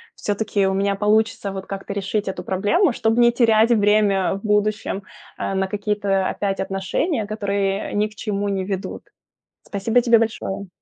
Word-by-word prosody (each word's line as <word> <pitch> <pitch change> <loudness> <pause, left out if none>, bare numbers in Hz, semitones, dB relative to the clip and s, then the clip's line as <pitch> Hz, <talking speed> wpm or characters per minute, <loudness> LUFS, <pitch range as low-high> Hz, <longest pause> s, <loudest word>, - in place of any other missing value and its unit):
всё-таки 205 -1 0
у 190 - 0
меня 200 0 +1
получится 210 0 +1
вот 190 0 -6
как-то 195 0 -6
решить 200 +1 -2
эту 185 -2 -4
проблему, 205 - +2
чтоб 225 0 0
не 240 0 +6
терять 230 -1 +4
время 205 -3 +3
в 195 - -7
будущем, 210 -1 0 0.3
а, 195 - -2
на 190 0 0
какие-то 200 -1 0
опять 195 -1 -2
отношения, 195 - -1
которые 200 -2 -2
ни 210 +1 +1
к 215 - -17
чему 205 -1 -2
не 195 -1 -1
ведут. 190 0 -4 0.6
Спасибо 220 +4 +1
тебе 235 -1 +5
большое. 210 -3 -3
205 Hz, 160 wpm, -21 LUFS, 195-215 Hz, 0.6 s, не